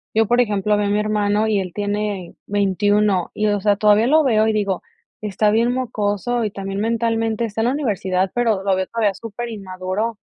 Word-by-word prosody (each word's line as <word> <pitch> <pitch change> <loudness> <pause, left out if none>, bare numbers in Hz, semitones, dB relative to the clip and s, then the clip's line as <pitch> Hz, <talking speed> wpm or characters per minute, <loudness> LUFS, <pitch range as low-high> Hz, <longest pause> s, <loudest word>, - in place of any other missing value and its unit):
yo, 225 0 +3
por 240 +2 +4
ejemplo, 210 -2 +1
veo 205 -1 0
a - - -1
mi 205 +1 +1
hermano, 210 0 +1
y 210 -2 +1
él 185 -2 -4
tiene 205 -3 -3
21. 205 -1 +1
Y, 215 - 0
o 205 -1 0
sea, 205 0 +3
todavía 210 +2 +4
lo 310 +3 +4
veo, 220 -4 +3
y 220 - +1
digo: 200 -3 -1 0.4
"Está 210 0 +1
bien 230 +3 +2
mocoso", 235 -1 -1
y 210 - -1
también 195 0 -5
mentalmente 225 0 0
está 225 0 -3
en - - +1
la 255 - +1
universidad, 190 -9 -1
pero 225 -5 +1
lo 195 -1 +2
veo 185 0 -2
todavía 220 -4 0
súper 230 +3 -7
inmaduro. 195 +2 -4
210 Hz, 205 wpm, -20 LUFS, 200-225 Hz, 0.4 s, por